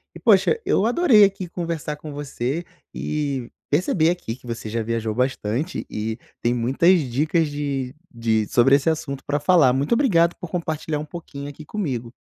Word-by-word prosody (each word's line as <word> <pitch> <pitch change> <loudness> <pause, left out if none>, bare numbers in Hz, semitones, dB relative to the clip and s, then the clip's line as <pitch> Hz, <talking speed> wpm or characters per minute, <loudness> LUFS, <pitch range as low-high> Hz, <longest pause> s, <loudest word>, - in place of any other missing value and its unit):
E, - - -9
poxa, 460 - +4
eu 200 - +2
adorei, 245 -5 +5
aqui, 195 -2 +1
conversar 165 -3 -4
com 150 0 -9
você 145 +2 -3 0.3
e 140 -5 -3 0.2
perceber, 160 +1 +2
aqui, 175 -10 -3
que 125 - -16
você 115 -1 -5
já 115 +2 -2
viajou 115 -1 -2
bastante 125 - -1
e 110 +1 -3 0.2
tem 120 - +2
muitas 135 +10 +3
dicas 150 +5 +1
de 140 -3 -3 0.2
de 110 -2 0
sobre 125 +5 +5
esse 140 +3 +2
assunto 140 -4 -3
pra 145 0 -1
falar. 150 -3 +5
Muito 140 - +1
obrigado 175 -10 +3
por 175 - -8
compartilhar 160 -3 -2
um 150 - -5
pouquinho, 150 -4 -8
aqui, 145 +2 -10
comigo. 135 - -4
145 Hz, 170 wpm, -23 LUFS, 125-170 Hz, 0.3 s, adorei